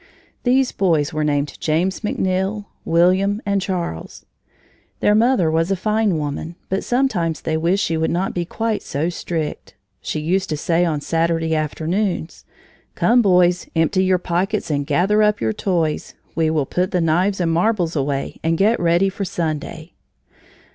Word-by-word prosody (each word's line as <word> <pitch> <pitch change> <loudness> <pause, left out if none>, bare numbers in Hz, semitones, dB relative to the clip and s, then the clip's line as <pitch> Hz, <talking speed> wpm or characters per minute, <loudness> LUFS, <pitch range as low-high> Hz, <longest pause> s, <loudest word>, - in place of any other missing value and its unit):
These 260 +1 +2
boys 165 -5 +1
were 155 0 -1
named 145 -1 -1
James 170 +5 0
McNeill, 195 0 -1 0.2
William, 185 +5 +3
and 200 -1 +1
Charles. 175 - -4 0.7
Their 210 - +3
mother 220 -6 +3
was 165 +2 +1
a 195 - +2
fine 215 -1 +1
woman, 150 +3 -4
but 190 +1 -1
sometimes 210 - 0
they 160 - -1
wished 175 +5 +1
she 165 - -1
would 160 0 0
not 180 +3 -1
be 175 - -1
quite 220 +5 -2
so 150 +5 -2
strict. 165 -3 -4 0.3
She - - -3
used 180 +5 0
to 155 - -1
say 170 +3 +1
on 155 -4 -1
Saturday 165 0 0
afternoons: 165 +4 -2 0.5
"Come, 240 +1 +4
boys, 180 -3 +3
empty 165 +4 +2
your 185 0 +3
pockets 180 +2 -1
and 145 -1 -1
gather 210 +4 +2
up 210 0 +3
your 110 -1 0
toys; 165 - -1 0.2
we 160 -1 +1
will 155 -3 0
put 180 +6 -1
the 180 - 0
knives 175 +5 +1
and 170 -2 +1
marbles 175 -1 +1
away 140 -1 -2
and 165 +1 +1
get 215 +5 +3
ready 175 +3 +3
for 195 +1 -3
Sunday." 160 -1 -4
175 Hz, 160 wpm, -20 LUFS, 160-195 Hz, 0.7 s, Come